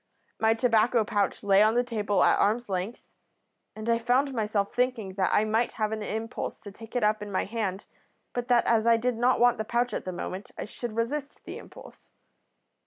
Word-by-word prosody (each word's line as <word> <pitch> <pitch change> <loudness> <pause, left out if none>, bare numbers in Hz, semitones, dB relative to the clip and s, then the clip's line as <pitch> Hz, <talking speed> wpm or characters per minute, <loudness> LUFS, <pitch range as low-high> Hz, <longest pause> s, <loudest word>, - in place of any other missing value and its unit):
My 225 0 +3
tobacco 230 0 +3
pouch 205 0 -1
lay 200 0 +5
on 215 +2 +4
the 245 - +3
table 210 -4 0
at - - +4
arm's 230 +4 +1
length, 195 +4 -3 0.7
and 215 +1 -7
I 230 0 +2
found 255 +4 +1
myself 210 -3 -1
thinking 245 -6 -1
that 190 -1 +1
I 210 - +3
might 225 +2 0
have 215 -1 -1
an 220 -1 -3
impulse 220 +2 -4
to 205 - -9
take 225 +4 -13
it 245 - +1
up 210 0 +2
in 205 -1 -6
my 190 - 0
hand 200 -3 -3 0.5
but 245 0 -3
that 245 -2 +3
as 230 -1 +2
I 230 0 +6
did 245 +1 -1
not 245 +3 +2
want 245 -2 +4
the - - 0
pouch 240 +2 -1
at - - -4
the 185 - -3
moment 185 +2 -6
I - - -4
should 230 +1 -7
resist 275 +5 -3
the - - -7
impulse. - - -14
225 Hz, 210 wpm, -27 LUFS, 210-240 Hz, 0.7 s, I